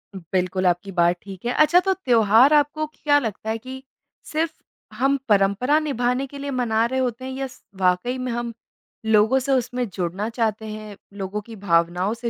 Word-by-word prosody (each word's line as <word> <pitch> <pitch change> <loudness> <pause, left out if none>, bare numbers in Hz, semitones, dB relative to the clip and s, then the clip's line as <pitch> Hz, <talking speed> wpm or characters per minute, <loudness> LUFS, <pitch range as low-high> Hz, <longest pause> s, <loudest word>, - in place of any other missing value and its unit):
बिल्कुल 185 +1 -2
आपकी 180 +3 0
बात 175 -1 +3
ठीक 195 +2 -10
है। 245 - +1
अच्छा 305 +4 +5
तो 385 - +3
त्योहार 245 - +4
आपको 300 +1 +2
क्या 295 -1 +1
लगता 220 -4 -4
है 220 - 0
कि, 260 +3 -9 0.5
सिर्फ़ 315 +1 0 0.4
हम 270 +4 +2
परंपरा 205 +8 +3
निभाने 260 -3 -1
के 280 +1 -10
लिए 280 0 -4
मना 230 -3 +1
रहे 260 +2 -1
होते 255 -1 -2
हैं 260 - -5
या 270 +1 -3
स 255 - -17 0.2
वाक़ई 185 +8 +1
में 255 -1 -3
हम 235 0 -3 0.5
लोगों 220 +4 +4
से 270 +1 -2
उसमें 250 -1 0
जुड़ना 185 +4 -2
चाहते 220 -2 -1
हैं, 215 -1 -7 0.2
लोगों 200 +1 -4
की 225 +2 -11
भावनाओं 175 +3 +2
से 235 +1 -4
235 Hz, 185 wpm, -23 LUFS, 200-265 Hz, 0.5 s, अच्छा